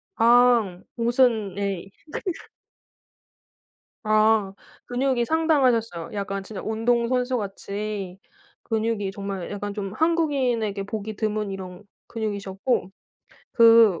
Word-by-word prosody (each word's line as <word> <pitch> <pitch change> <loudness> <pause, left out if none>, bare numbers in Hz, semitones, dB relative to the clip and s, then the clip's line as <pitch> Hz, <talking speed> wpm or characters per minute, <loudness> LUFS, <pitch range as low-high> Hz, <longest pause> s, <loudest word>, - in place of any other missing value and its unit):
아. 235 -5 +4 0.2
옷은 230 -4 +2
예 200 -2 -1
이 195 - -15 0.4
그러니까. - - -9 1.5
아. 215 -2 +3 0.3
근육이 250 -1 0
상당하셨어요. 255 - +1
약간 195 -1 -3
진짜 200 0 -7
운동선수같이 220 -4 -1 0.5
근육이 220 -3 -1
정말 195 -2 -5
약간 205 0 -4
좀 195 -2 -4
한국인에게 260 -10 +1
보기 215 +1 -5
드문 215 -2 -2
이런 185 0 -8 0.2
근육이셨고 200 -2 -2 0.6
그 230 -6 +6
215 Hz, 230 characters per minute, -24 LUFS, 195-240 Hz, 1.5 s, 그